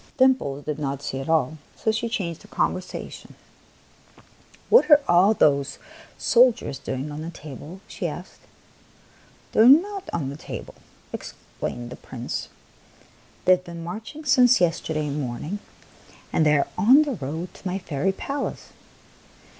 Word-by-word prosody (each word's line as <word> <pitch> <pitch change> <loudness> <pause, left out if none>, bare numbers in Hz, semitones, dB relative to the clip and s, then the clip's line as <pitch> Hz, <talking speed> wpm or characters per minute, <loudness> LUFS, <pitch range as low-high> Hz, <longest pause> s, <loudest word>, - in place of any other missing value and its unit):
Dimples 255 - +2
did 150 -1 -3
not 140 -1 -3
see 135 - -3
at 135 - -6
all; 155 -1 +1 0.2
so 220 - 0
she 225 +2 -2
changed 170 -8 -3
the - - -15
conversation. 185 0 -3 0.7
" - - -27
What 480 -6 +7
are 295 -1 +9
all 185 +5 +5
those 140 -4 +2 0.4
soldiers 240 - +3
doing 135 +3 -4
on 150 +1 -6
the 165 - -5
table? 155 +3 -10
" - - -30
she - - -4
asked. - - -8 0.6
" - - -30
They - - 0
are 225 - +8
not 385 +7 +4
on 145 -5 -2
the 140 - -8
table," - - -8 0.4
explained 120 0 -6
the - - -8
Prince. 125 -2 -6 0.5
" - - -29
They - - +6
have 180 0 +4
been 170 -1 -8
marching 225 - -7
since 250 -2 +5
yes 175 -2 +2
terday 155 -2 -2
morning, 145 - -4 0.7
and 155 - +3
they 150 0 +5
are 140 - +1
on 260 +8 +7
the 290 -3 -2
road 160 - -5
to - - -8
my 185 +1 -1
fairy 170 -1 -1
palace." 275 +8 -4
170 Hz, 160 wpm, -24 LUFS, 145-225 Hz, 0.7 s, are